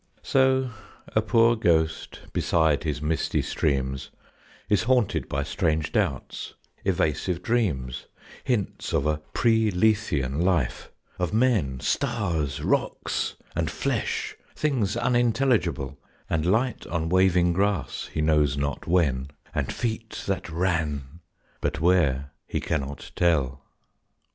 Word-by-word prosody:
So 130 -1 +3 0.4
a - - +5
poor 115 +1 +4
ghost, 80 -7 0
beside 80 -2 +2
his 75 -1 -2
misty 80 0 0
streams, 65 -2 -1 0.6
Is 105 - +3
haunted 125 -4 +2
by 70 0 -1
strange 80 -1 0
doubts, - - -2 0.3
evasive 85 +4 0
dreams, 75 - -1 0.4
Hints 120 -7 -2
of - - +2
a 75 0 +1 0.2
pre 110 -2 +3
Lethean 90 -9 +1
life, 85 -8 0 0.3
of 90 +3 -1
men, 105 - +2
Stars, 85 - -1
rocks, - - 0 0.2
and - - 0
flesh, - - -2 0.2
things 120 -9 0
unintelligible, 120 - +1 0.3
And 80 0 0
light 115 +6 +1
on 85 -1 -1
waving 90 -1 +4
grass, 95 -7 -1
he 75 - -1
knows 75 -2 +3
not 70 0 -2
when, 75 -7 +2 0.3
And - - -1
feet 115 -1 -3
that 95 -3 -2
ran, 80 -4 -1 0.4
but - - -1
where, 75 -6 +2 0.2
he - - -2
cannot 70 -2 -3
tell. 70 -6 +1
85 Hz, 115 wpm, -26 LUFS, 75-110 Hz, 0.6 s, a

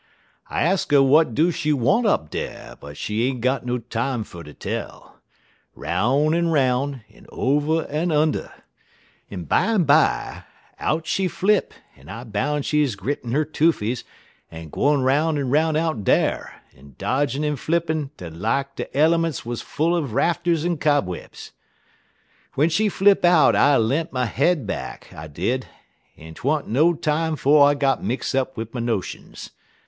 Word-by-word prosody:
I - - 0
ax 180 +4 +1
'er - - +5
w'at 140 -2 +4
do 165 +4 +3
she 160 -2 -1
want 150 - +2
up 80 - 0
dar, - - -6
but 70 0 -12
she 110 +3 -1
ain't 130 -3 -3
got 130 +1 0
no 125 0 0
time 120 +1 -3
fer 85 -4 -11
ter 75 -2 -12
tell; - - -7 0.6
'roun' 140 +7 +1
en 170 0 +1
'roun', 135 -4 0
en - - -19
over 150 +4 0
en 160 +4 -2
under. 155 0 0 0.8
En 90 -4 -7
bimeby, 160 - +2 0.4
out 160 +1 -1
she 190 +3 0
flip, 200 +3 0 0.2
en 70 +4 -17
I 115 - -7
boun' 130 +6 -2
she 150 +1 +2
grittin' 120 +2 -4
'er 155 +1 +2
toofies 140 -7 0 0.5
en 80 -1 -9
gwine 145 - +1
'roun' 150 +4 +2
en 135 -3 -2
'roun' 155 +2 +2
out 155 -9 -1
dar, - - 0
en 70 0 -17
dodgin' 140 +1 -1
en 150 0 0
flippin' 155 -1 -1
des 85 -2 -8
lak 115 +11 -2
de - - -6
elements 165 -2 +2
wuz 120 0 -4
full 165 +3 -1
er 170 - +1
rafters 165 +5 0
en 175 -3 -1
cobwebs. 145 - -2 1.0
"W'en 150 +4 +2
she 210 +6 +2
flip 200 +1 +3
out 175 -3 +5
I 145 -1 +4
le'nt 135 +9 0
my 125 -1 -1
head 140 +4 +1
back, 100 - -6
I 75 +1 -9
did, 100 - -2 0.5
en 80 +1 -11
't - - -14
wa'n't 145 +2 0
no 155 +9 +3
time 160 0 -1
'fo' 145 +1 +4
I 145 0 +6
git 140 -1 +1
mix 125 +4 -2
up 130 -1 -1
wid 115 0 -6
my 125 - -4
notions. 115 -5 -4
140 Hz, 165 wpm, -22 LUFS, 120-160 Hz, 1.0 s, I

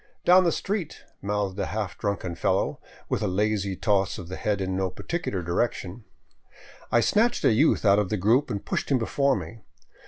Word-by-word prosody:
"Down 185 +1 +6
the 170 - +3
street," 190 -4 -3 0.2
mouthed 100 -1 -2
a - - -1
half 100 -5 -3
drunken 100 -3 -3
fellow, 85 - 0 0.3
with - - -1
a - - 0
lazy 100 0 0
toss 100 0 +1
of 90 -2 -8
the 95 - -5
head 105 0 -1
in 95 -1 -2
no 95 0 0
particular 100 - -4
direction. 95 +3 -2 0.9
I 120 - +4
snatched 225 - +2
a - - +5
youth 140 +1 +3
out 100 0 +5
of 105 -3 -1
the 105 - 0
group 115 +9 +2
and 100 - -4
pushed - - -2
him 135 - +3
before 135 +3 +1
me. 115 - -7
105 Hz, 190 wpm, -26 LUFS, 95-125 Hz, 0.9 s, Down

